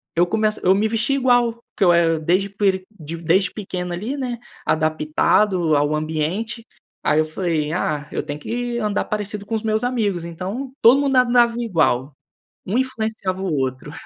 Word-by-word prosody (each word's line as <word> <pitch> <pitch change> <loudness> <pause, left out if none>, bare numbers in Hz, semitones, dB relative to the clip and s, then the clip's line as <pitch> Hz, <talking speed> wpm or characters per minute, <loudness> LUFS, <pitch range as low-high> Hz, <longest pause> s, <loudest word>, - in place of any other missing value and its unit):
eu 170 +1 +4
começo 215 +3 0
eu 185 - +6
me 215 +2 +2
vestia 230 +5 +1
igual, 245 -3 +3 0.2
porque 200 - 0
eu 175 - +6
era 165 -1 +3
desde 185 +5 +1
peri 195 -2 0
di 160 0 -7
desde 175 +4 +2
pequeno 180 -4 -5
ali 215 +10 -3
né, 250 -4 -3 0.3
adaptado 155 +3 +2
ao 145 +1 +2
ambiente, 160 +10 -2 0.4
aí 150 - +3
eu 155 - +3
falei: 155 -2 -2
"Ah, 150 -4 -2
eu - - -2
tenho 145 +1 -6
que 240 +6 -3
andar 210 -3 0
parecido 210 -1 -4
com 225 - -6
os 220 - -1
meus 220 +1 0
amigos". 210 -9 0
Então, 190 +11 -5
todo 245 +5 +7
mundo 275 -2 +1
andava 240 -1 +4
igual. 155 - +1 0.5
Um 205 +6 0
influenciava 220 -7 -2
o 190 -4 -1
outro. 130 +1 -3
195 Hz, 175 wpm, -21 LUFS, 160-230 Hz, 0.5 s, todo